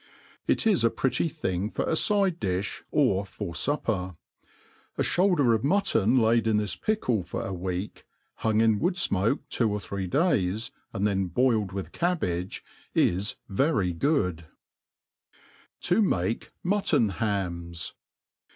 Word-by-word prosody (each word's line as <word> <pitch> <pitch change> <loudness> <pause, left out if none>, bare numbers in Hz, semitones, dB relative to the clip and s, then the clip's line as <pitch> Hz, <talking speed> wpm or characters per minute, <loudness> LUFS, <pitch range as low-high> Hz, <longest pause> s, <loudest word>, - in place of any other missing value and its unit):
It - - +2
is 210 - +3
a 115 - +5
pretty 135 +7 0
thing 100 - -2
for - - -2
a - - +1
fide 195 -1 +3
difli, 95 +1 -2
or 95 +1 +2
for 100 -2 -6
fupper. 95 - -1 0.8
A - - +1
(houlder 175 -10 +3
of 110 0 0
mutton 140 - +2
laid 115 -1 +3
in 110 -1 +3
this 105 -1 -1
pickle 125 - 0
for 90 - -5
a 100 - -4
week, 90 +2 -4 0.3
hung 110 -1 +1
in 110 -2 +3
wood 175 +3 +1
fmoke 115 - +1
two 115 -3 +1
or 105 - -1
three 100 -1 -4
days, 110 - +1 0.2
and 100 - -1
then 95 -2 +1
boiled 110 +2 +2
^itb 95 0 -6
cabbage, 95 - -1 0.3
is 95 +4 +1
very 100 - +1
good* 90 - 0 1.4
To 180 +5 +2
mafe 100 - 0 0.2
Muiiof^ 175 - +1
Hams. 85 -6 -2
110 Hz, 140 wpm, -27 LUFS, 95-145 Hz, 1.4 s, a